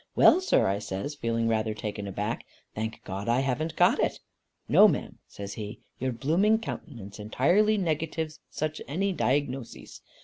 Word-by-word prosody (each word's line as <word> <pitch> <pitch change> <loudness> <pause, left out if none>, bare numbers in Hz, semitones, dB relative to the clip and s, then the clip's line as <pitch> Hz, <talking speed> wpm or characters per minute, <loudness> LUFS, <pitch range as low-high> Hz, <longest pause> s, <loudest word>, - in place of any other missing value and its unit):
'Well 365 - +7
sir,' 375 - +3
I 100 +1 +1
says, 100 +7 -4
feeling 115 -4 -1
rather 110 -1 0
taken 105 -1 -5
aback, 105 +4 -3 0.3
'thank 110 +1 -4
God 100 +4 -4
I 120 +3 +3
haven't 140 +5 -1
got - - +4
it.' - - +1 0.5
'No, - - +8
ma'am,' - - -2
says 100 0 -7
he, 105 0 -6 0.2
'your 130 +1 -1
blooming 165 - +2
countenance 115 - -7
entirely 175 - +3
negatives 160 -2 -2
any - - -51
such 155 0 -3 0.4
dyingnoses. 130 +1 -2
125 Hz, 150 wpm, -28 LUFS, 105-155 Hz, 0.5 s, No